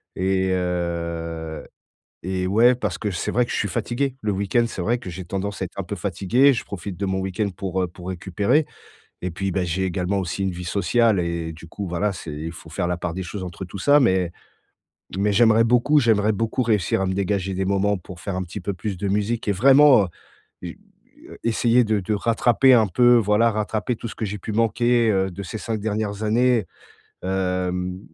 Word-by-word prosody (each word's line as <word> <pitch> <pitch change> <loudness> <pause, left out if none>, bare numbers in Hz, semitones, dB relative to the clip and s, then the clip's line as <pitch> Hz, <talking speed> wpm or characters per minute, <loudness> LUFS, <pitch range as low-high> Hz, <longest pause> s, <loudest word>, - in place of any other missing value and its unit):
et 95 0 +1
heu 85 -3 -3 0.6
et 95 -1 -1
ouais, 115 +6 +5
parce 125 - -3
que 105 -3 -2
c'est 85 - -3
vrai 125 0 +2
que - - -9
je - - -1
suis 100 - -1
fatigué. 125 +5 -2
Le 105 -1 0
week-end, 100 +4 +1
c'est 110 - -6
vrai 120 +6 +1
que 115 -7 -8
j'ai 90 +1 -7
tendance 95 +2 -4
à - - 0
être 90 - -16
un 100 - -1
peu 100 - -5
fatigué. 100 +9 +2
Je 115 - -3
profite 95 -1 -7
de 100 - -3
mon 95 0 -1
week-end 95 +2 -2
pour, 95 0 -2
heu, - - +1
pour 90 +1 -10
récupérer 100 - +1 0.6
et 90 - -2
puis, 95 +2 -2
bah, 95 0 -1
j'ai 90 +2 -1
également 95 +2 -1
aussi 95 +2 -3
une 95 - -1
vie 90 +1 -7
sociale 100 +4 +2
et 85 -1 -3
du 80 +1 -12
coup, 100 +2 -6
voilà, 100 +4 0
c'est 85 -4 -7
il 80 +2 -5
faut 80 -1 -12
faire 85 - -2
la 90 - -1
part 90 -1 -4
des 95 0 -4
choses 95 +2 -6
entre 90 +1 -7
tout 95 +3 -8
ça. 145 +9 +5
Mais 95 -8 +2 0.9
mais 105 +1 +2
j'aimerais 115 +1 +5
beaucoup, 125 +6 +4
j'aimerais 110 -3 +3
beaucoup 115 +4 -1
réussir 105 -6 +1
à 95 - 0
me 95 - -1
dégager 95 -1 -1
des 95 +1 -1
moments 100 +1 +1
pour 90 0 -11
faire 100 -1 -4
un 95 - -1
petit 90 +3 -7
peu 100 +3 -3
plus 95 +1 -4
de 100 - -4
musique 105 +4 -1
et - - +4
vraiment, 135 +2 +6
heu, 90 - -5 0.6
j 90 - -7 0.5
heu, - - -11
essayer 115 +1 +3
de 110 -1 +1
de 100 +4 -2
rattraper 120 +4 +3
un 110 -3 +5
peu, 120 +7 +5
voilà, 110 +1 +3
rattraper 110 +3 -2
tout 115 - -7
ce - - -9
que 110 - -3
j'ai 105 0 -5
pu 110 - -6
manquer, 115 +1 +2
heu, 95 -1 +1
de 100 +2 -7
ces 105 +4 -6
5 110 -2 -3
dernières 105 0 -2
années. 120 0 +2 0.6
Hem, 90 -1 -2
100 Hz, 220 wpm, -23 LUFS, 90-115 Hz, 0.9 s, vraiment